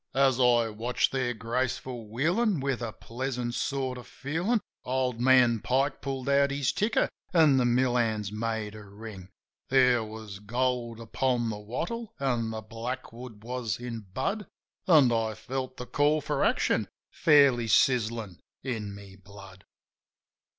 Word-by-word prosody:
As 135 -2 +3
I 120 -2 +4
watched 115 +3 0
their 125 -2 -1
graceful 120 0 -3
wheelin' 170 - +1
with 135 -2 -1
a 115 -2 -3
pleasant 120 +1 -4
sort 130 -1 -2
of 125 - -12
feelin' 170 - -1 0.2
Old 125 -2 -1
man 125 -3 +5
Pike 135 +5 0
pulled 135 -1 -4
out 140 0 +4
his 140 0 0
ticker, 210 +10 +1 0.3
an' 155 -5 +6
the 125 - +3
mill 125 +1 +2
hands 110 -4 0
made 110 -1 -3
a 105 -1 -10
ring. 100 -2 -10 0.4
There 125 -3 +4
was 110 -2 -8
gold 120 +1 -1
upon 120 0 0
the 105 - -5
wattle 200 - -5
an' 120 -4 0
the 110 0 -5
blackwood 115 0 -7
was 120 -2 -3
in 115 -4 -6
bud, 195 - -2 0.4
An' 150 -8 +6
I 110 -1 0
felt 130 +3 -5
the 125 - -6
call 145 +4 +2
for - - -1
action - - +2 0.2
fairly 140 -6 +4
sizzin' 115 -6 +2 0.2
in 110 -6 -4
my 100 -1 -12
blood. 100 -1 -13
125 Hz, 145 wpm, -28 LUFS, 110-135 Hz, 0.4 s, an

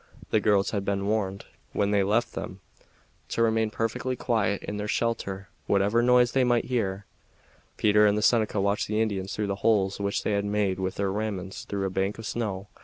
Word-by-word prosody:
The 110 - +4
girls 100 -1 +2
had 100 -3 -1
been 100 0 -1
warned, 100 -2 -1 0.3
when 100 0 +1
they 100 -1 +3
left 105 +5 +1
them, - - -6 0.7
to 115 - +1
remain 110 -1 +2
perfectly 115 +4 -2
quiet 110 -5 0
in 105 - -4
their 105 0 -3
shelter 100 -4 -2 0.2
whatever 100 +4 +3
noise 125 0 +4
they 135 - +3
might 120 -1 +2
hear. 100 -6 -2 0.7
Peter 105 0 +5
and 105 0 +2
the 105 - 0
Seneca 110 -3 +3
watched 100 +1 0
the 105 +1 -1
Indians 100 -4 -1
through 105 -2 -1
holes 100 -1 +1
which 100 0 -1
they - - 0
had 100 -1 +1
made 100 -2 0
with 95 0 -2
their 100 -1 -1
ramrods 100 -2 -4
through 100 -1 -2
a 95 - -2
bank 95 +2 -1
of 115 - -8
snow. 105 -4 -3
105 Hz, 195 wpm, -27 LUFS, 100-110 Hz, 0.7 s, Peter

